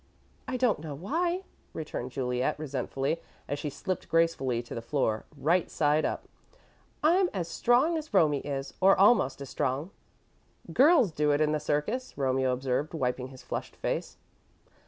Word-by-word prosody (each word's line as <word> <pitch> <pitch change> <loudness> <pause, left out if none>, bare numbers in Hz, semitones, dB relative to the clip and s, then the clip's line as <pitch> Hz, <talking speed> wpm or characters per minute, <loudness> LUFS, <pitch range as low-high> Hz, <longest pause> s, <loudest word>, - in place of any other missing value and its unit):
"I 255 - -2
don't 245 -7 +2
know 150 -2 -6
why," 340 - -1 0.3
returned 150 -5 -5
Juliet, 125 -1 -1
resentfully, 135 +1 -2 0.3
as 145 - -3
she 150 - -3
slipped 185 +5 -4
gracefully 135 -8 +1
to 120 - -9
the 115 - -4
floor, 115 -3 -1
right 170 +5 +2
side 150 0 +2
up. - - -3 0.8
"I'm 355 +4 +4
as 175 -3 -2
strong 255 - +2
as 310 - -10
Romie 155 -8 +3
is, 135 -1 -4
or 195 +1 +6
almost 190 - +4
as 140 - -7
strong." 140 +8 -1 0.8
"Girls 275 - +5
do 150 -1 +1
it 145 0 +3
in 155 -1 +2
the 155 - +1
circus," 150 - -2
Romeo 130 -1 +1
observed, 130 +5 -1
wiping 125 -3 -1
his 130 -1 -13
flushed - - -5
face. - - -3
150 Hz, 155 wpm, -29 LUFS, 135-195 Hz, 0.8 s, or